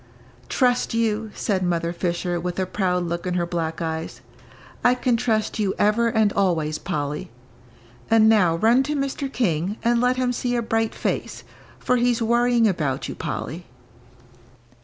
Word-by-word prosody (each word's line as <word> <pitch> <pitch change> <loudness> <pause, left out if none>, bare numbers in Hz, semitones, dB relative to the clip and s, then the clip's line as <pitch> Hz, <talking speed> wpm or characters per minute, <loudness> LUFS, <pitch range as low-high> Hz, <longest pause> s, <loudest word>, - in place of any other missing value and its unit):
"Trust 245 -3 +1
you," 225 -1 0
said 195 -4 -1
Mother 170 -1 -1
Fisher, 175 0 -2
with 175 +1 -4
a 190 - 0
proud 180 -2 0
look 170 +1 -3
in 180 - -1
her 175 -1 +1
black 165 -2 -3
eyes, 160 0 -4 0.6
"I 245 +1 +5
can 250 -1 +1
trust 225 -2 0
you 200 -3 0
ever 215 +3 +3
and 220 -3 +2
always, 160 -6 0
Polly; 145 0 -3 0.8
and 225 -1 +5
now 195 -7 +4
run 230 +8 +4
to 300 - 0
Mr. 275 0 -2
King 190 - -1
and 235 0 +2
let 250 +1 +2
him 250 -1 0
see 245 0 -1
a 235 - 0
bright 225 0 -1
face, - - -3 0.3
for 250 - +1
he's 240 -1 +2
worrying 235 0 +3
about 155 -9 -1
you, - - -5
Polly." 170 +3 -5
210 Hz, 160 wpm, -23 LUFS, 175-235 Hz, 0.8 s, I